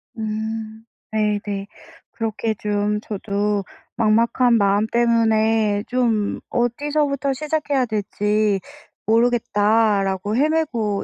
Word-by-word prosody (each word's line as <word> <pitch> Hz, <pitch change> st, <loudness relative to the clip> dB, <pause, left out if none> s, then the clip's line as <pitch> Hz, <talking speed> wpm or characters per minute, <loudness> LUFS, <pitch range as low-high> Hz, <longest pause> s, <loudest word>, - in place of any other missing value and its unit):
음, 220 Hz, 0 st, -4 dB, 0.3 s
네네. 205 Hz, -2 st, -1 dB, 0.4 s
그렇게 225 Hz, -1 st, -2 dB
좀 210 Hz, 0 st, -1 dB
저도 205 Hz, -1 st, -2 dB, 0.3 s
막막한 235 Hz, +2 st, +3 dB
마음 200 Hz, +1 st, +2 dB
때문에 220 Hz, -3 st, +2 dB
좀 230 Hz, -5 st, 0 dB
'어디서부터 280 Hz, +3 st, 0 dB
시작해야 290 Hz, -2 st, -1 dB
될지 210 Hz, -1 st, 0 dB, 0.5 s
모르겠다.'라고 215 Hz, -3 st, +2 dB
헤매고 265 Hz, -9 st, 0 dB
220 Hz, 205 characters per minute, -21 LUFS, 210-240 Hz, 0.5 s, 막막한